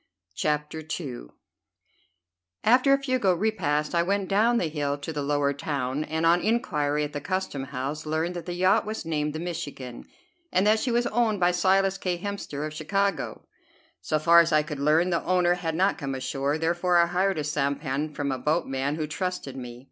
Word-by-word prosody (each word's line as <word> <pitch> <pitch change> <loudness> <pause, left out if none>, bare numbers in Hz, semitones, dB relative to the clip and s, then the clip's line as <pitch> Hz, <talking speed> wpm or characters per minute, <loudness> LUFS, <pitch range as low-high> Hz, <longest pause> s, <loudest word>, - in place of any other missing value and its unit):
CHAPTER 150 - -1 0.2
II - - -6 1.4
After 255 +4 +5
a 275 0 +3
frugal 255 -9 +2
repast 165 -7 0
I 170 - +3
went 195 +2 0
down 225 +4 +3
the 205 - +1
hill 145 -2 -2
to 145 +3 -6
the 150 - -2
lower 145 0 +1
town, 140 0 -2
and 160 +1 -1
on 170 +2 +4
inquiry 150 -10 0
at 150 - -4
the 145 - -4
custom 185 -7 -3
house 140 +3 -4
learned 160 +3 -1
that 170 -1 -6
the 175 - -3
yacht 185 +2 +3
was 215 +1 -5
named 150 -2 -1
the 155 - -4
"Michigan," 150 -8 -6 0.5
and 185 - +2
that 215 +1 +4
she 255 - -1
was 240 0 +2
owned 225 -3 +1
by 175 0 +4
Silas 190 +2 +2
K. 180 -2 -1
Hemster, 175 -6 -4
of 155 - -5
Chicago. 195 +4 -1 0.6
So 120 - 0
far 170 +2 +6
as 170 0 +3
I 155 -1 +4
could 150 -2 -6
learn, 155 +5 +3
the 170 - 0
owner 180 -1 +3
had 170 -3 -3
not 190 +3 +2
come 135 -3 -3
ashore; 135 +2 -1
therefore 175 +2 +1
I 170 - +6
hired 185 +2 0
a 150 - -1
sampan 140 0 -1
from 140 -1 -1
a 130 - -2
boatman 145 -2 0
who 155 -1 -2
trusted 180 -3 -4
me. 120 -2 -8
160 Hz, 195 wpm, -26 LUFS, 145-185 Hz, 1.4 s, far